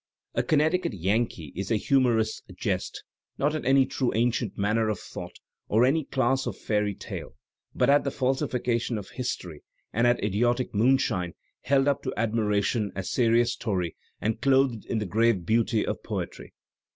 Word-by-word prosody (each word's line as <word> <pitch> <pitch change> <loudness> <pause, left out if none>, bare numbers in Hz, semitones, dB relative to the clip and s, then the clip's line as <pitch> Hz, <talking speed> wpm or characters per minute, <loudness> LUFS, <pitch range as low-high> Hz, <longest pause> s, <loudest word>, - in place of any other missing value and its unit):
"A - - +1
Connecticut 155 +2 +1
Yankee" 95 - -1
is 95 +1 -4
a 115 - +2
humourist's 115 -1 +2
jest, - - -3 0.3
not 145 +2 +1
at 155 - -3
any 135 +1 +5
true 130 -1 -1
ancient 115 -2 0
manner 110 +2 +1
of 105 - -1
thought - - -8 0.3
or 115 +4 +4
at - - +5
any 155 +1 +1
class 130 0 +1
of - - -4
fairy 105 -2 0
tale, - - -8 0.4
but - - +2
at 145 +1 +5
the 140 - 0
falsification 125 -3 -1
of 100 -2 -7
history 90 - -4 0.3
and 120 +2 +3
at 120 -3 +2
idiotic 120 +5 +1
moon 120 +6 +4
shine 90 -7 -2 0.3
held 135 +2 +2
up 140 - +2
to - - -3
admiration 105 -1 0
as 95 -1 -4
serious 120 0 +3
story 95 -7 -2 0.2
and 110 +1 -2
clothed 135 -4 +2
in - - -1
the 105 - -1
grave 110 -1 +2
beauty 115 +1 +2
of - - -3
poetry. - - -6
115 Hz, 170 wpm, -27 LUFS, 105-130 Hz, 0.4 s, any